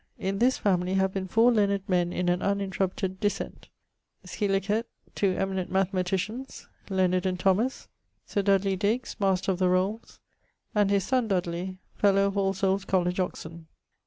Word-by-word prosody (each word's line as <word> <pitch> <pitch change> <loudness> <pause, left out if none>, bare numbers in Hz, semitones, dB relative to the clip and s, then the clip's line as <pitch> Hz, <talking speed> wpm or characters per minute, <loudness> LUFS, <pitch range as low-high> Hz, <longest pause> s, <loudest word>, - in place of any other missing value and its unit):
In 195 +1 -2
this 255 +2 +3
family 185 -2 +1
have 190 0 +1
been 190 -1 -3
four 225 +5 +4
learned 200 -3 +1
men 175 -2 +1
in 180 0 -2
an 175 +1 +1
uninterrupted 190 -1 -1
descent 205 -1 -3 0.6
scilicet, 205 +2 0 0.3
two 190 -2 +1
eminent 190 -1 -2
mathematicians 190 +6 -2 0.2
(Leonard 185 -1 +1
and 185 -1 -2
Thomas), 200 +8 +1 0.4
Sir 200 - -1
Dudley 195 -1 +2
Digges, 215 +6 -1
Master 195 -1 +1
of 185 - -3
the 185 -1 +3
Rolles, 190 +5 -1 0.5
and 205 -2 +3
his 200 -1 +2
sonne 250 +1 +1
Dudley, 180 -1 -2 0.2
fellow 195 -1 +3
of 200 - 0
Allsoules 195 0 +1
College, 180 -1 0
Oxon. 165 -2 -4
195 Hz, 150 wpm, -27 LUFS, 185-200 Hz, 0.6 s, four